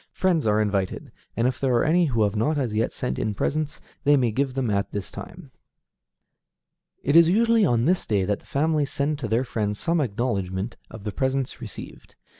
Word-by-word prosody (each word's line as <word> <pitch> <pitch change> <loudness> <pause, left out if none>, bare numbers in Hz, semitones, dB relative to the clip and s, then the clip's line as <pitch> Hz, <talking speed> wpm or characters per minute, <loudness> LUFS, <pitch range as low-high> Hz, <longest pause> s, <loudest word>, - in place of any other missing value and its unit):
Friends 170 -9 +1
are 105 0 +3
invited, 100 -3 -1 0.3
and 115 +2 +3
if 130 -1 -2
there 130 -3 +1
are 120 - +3
any 170 +3 +3
who 115 -7 +1
have 100 0 0
not 150 +9 +1
as 125 -6 -1
yet 110 +2 0
sent 65 +1 -3
in 105 -1 -1
presents, 150 +7 -2 0.2
they 145 0 +5
may 125 -4 +2
give 130 +3 -1
them 130 -5 0
at 100 0 0
this 100 -3 -5
time. 170 -6 -10 1.5
It 145 - +1
is 170 0 +8
usually 225 +2 +4
on 120 -2 +2
this 180 +3 +1
day 100 -3 +1
that 100 +1 -1
the - - -24
family 150 +1 +1
send 145 +2 -1
to 125 - -3
their 115 +4 +1
friends 105 -4 -2
some 170 +4 +1
acknowledgment 100 -4 -2
of 110 -3 -10
the 105 - -3
presents 130 +1 -2
received. 110 -4 -9
125 Hz, 205 wpm, -24 LUFS, 105-150 Hz, 1.5 s, is